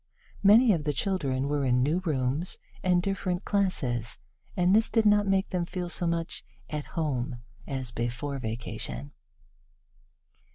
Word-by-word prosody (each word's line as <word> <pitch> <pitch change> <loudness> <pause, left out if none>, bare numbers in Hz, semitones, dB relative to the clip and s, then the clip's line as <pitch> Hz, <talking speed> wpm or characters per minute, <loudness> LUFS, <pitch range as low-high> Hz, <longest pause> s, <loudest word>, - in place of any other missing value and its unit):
Many 215 +3 +7
of 160 -4 -1
the 150 0 0
children 140 -8 0
were 145 0 0
in 125 -1 +3
new 155 +6 +2
rooms 150 -1 -1 0.2
and 180 -1 +3
different 190 -1 -1
classes, 135 - 0 0.4
and 180 +2 +4
this 220 +1 +4
did 225 -2 +2
not 205 -1 +5
make 195 0 +2
them 180 -2 0
feel 180 0 -4
so 175 0 -1
much 165 0 -2 0.3
"at 150 -1 -3
home" 130 -6 -1 0.3
as 130 -3 -3
before 125 +4 -3
vacation. 110 - -5
160 Hz, 140 wpm, -28 LUFS, 130-185 Hz, 0.4 s, Many